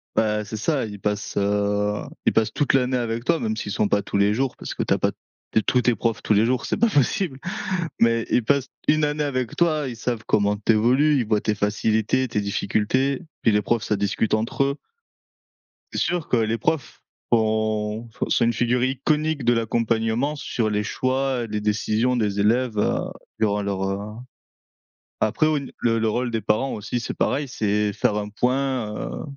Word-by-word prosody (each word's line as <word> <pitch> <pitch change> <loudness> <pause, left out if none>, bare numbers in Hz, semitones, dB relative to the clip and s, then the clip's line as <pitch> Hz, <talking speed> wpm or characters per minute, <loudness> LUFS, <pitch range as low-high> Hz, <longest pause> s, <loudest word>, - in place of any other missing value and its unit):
Bah, 105 -1 +1
c'est 110 +2 -6
ça, 135 +2 0
ils 105 -2 -8
passent, 105 0 -2
heu, 105 +1 +1 0.2
ils - - +3
passent 110 -1 +1
toute 145 - +1
l'année 130 -1 +2
avec 115 -1 -2
toi, 165 - +2
même 220 -1 -1
s'ils 105 - -4
sont 105 - +1
pas 100 - +2
tous 100 - -3
les 100 +1 +3
jours 130 +3 -1
parce - - -6
que - - -2
tu - - +1
as - - +1
pas - - +1 0.4
te - - +3
tous 125 +3 +2
tes 120 0 +3
profs 115 +2 -1
tous - - +2
les 105 +2 +4
jours, 125 +1 0
c'est - - -1
pas 235 - +3
possible. 145 - +1 0.6
Mais 115 0 +3
ils 125 - +2
passent 140 +2 +1 0.2
1 155 0 +4
année 150 0 0
avec 130 -4 -2
toi, 155 -4 +2
ils 120 - -6
savent 115 -1 -3
comment 105 0 +2
tu 110 +2 +2
évolues, 130 +7 +3
ils 120 - 0
voient 105 -1 +2
tes 105 - 0
facilités, 110 +4 +1
tes 105 - -1
difficultés. 110 - 0 0.2
Puis 115 - +4
les 105 0 +2
profs, 115 +1 0
ça 105 - 0
discute 100 +2 0
entre 115 +5 0
eux. 140 +1 -1 1.2
C'est - - -1
sûr 175 -3 -1
que 125 - +2
les 115 0 +1
profs 145 +7 -2 0.3
font 110 0 0 0.2
sont 120 - +2
une 115 - +2
figure 120 +2 +1
iconique 150 +2 0
de 120 - +5
l'accompagnement 115 +4 0
sur 115 -5 -2
les 105 0 0
choix, 130 +1 -1
les 105 0 -3
décisions 110 +3 +1
des 105 -3 0
élèves, 115 +2 +2
heu, 105 - +1 0.4
durant 105 -1 +1
leur 100 -1 -2
heu, 95 +1 -2 1.2
après 110 +8 +2
au 155 -1 +2
n 140 -2 -4
le 115 -1 +1
le 110 - +1
rôle 120 +2 -1
des 115 - -1
parents 110 +6 +1
aussi, 110 +3 -3
c'est - - -4
pareil, 140 0 0
c'est 105 -3 0
faire 105 - +1
un 105 0 -2
point, 125 0 -1
heu, - - -5
115 Hz, 200 wpm, -23 LUFS, 105-130 Hz, 1.2 s, de